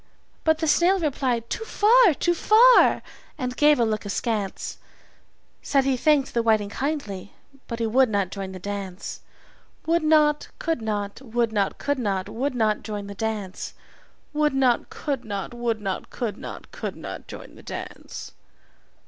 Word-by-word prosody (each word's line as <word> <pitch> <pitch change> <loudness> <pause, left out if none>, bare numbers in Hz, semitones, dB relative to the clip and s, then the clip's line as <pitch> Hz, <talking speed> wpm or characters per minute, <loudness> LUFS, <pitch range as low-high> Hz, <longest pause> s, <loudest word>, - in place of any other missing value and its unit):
But 315 -1 +3
the 320 0 -1
snail 350 +6 +4
replied 255 -7 -1
"Too 445 - -3
far, 445 - +5
too 345 - +1
far!" 460 +8 +6 0.3
and 250 -3 -3
gave 295 -1 +5
a 235 - +4
look 215 -1 -1
askance 205 -1 -3 0.8
Said 275 -1 +2
he 270 -1 +2
thanked 285 +1 +2
the 235 - +2
whiting 215 -3 +2
kindly, 215 -8 -4 0.3
but 230 - -4
he 230 - -1
would 250 +3 +4
not 200 -3 0
join 195 -2 -5
the 190 - -7
dance. 195 0 -5 0.7
Would 335 +1 +2
not, 305 -1 +3
could 325 -6 -1
not, 205 0 -3
would 235 -2 -1
not, 200 -2 0
could 285 -1 -1
not, 200 -4 -1
would 255 +5 -2
not 215 -3 +1
join 210 -2 -5
the 200 - -7
dance. 205 -2 -4 0.6
Would 300 -2 +2
not, 255 -3 +2
could 275 -5 -3
not, 200 -1 -5
would 240 -2 -1
not, 195 -2 -3
could 230 -4 -3
not, - - -9
could - - -5
not - - -8
join - - -10
the - - -14
dance. - - -7
240 Hz, 165 wpm, -25 LUFS, 205-295 Hz, 0.8 s, far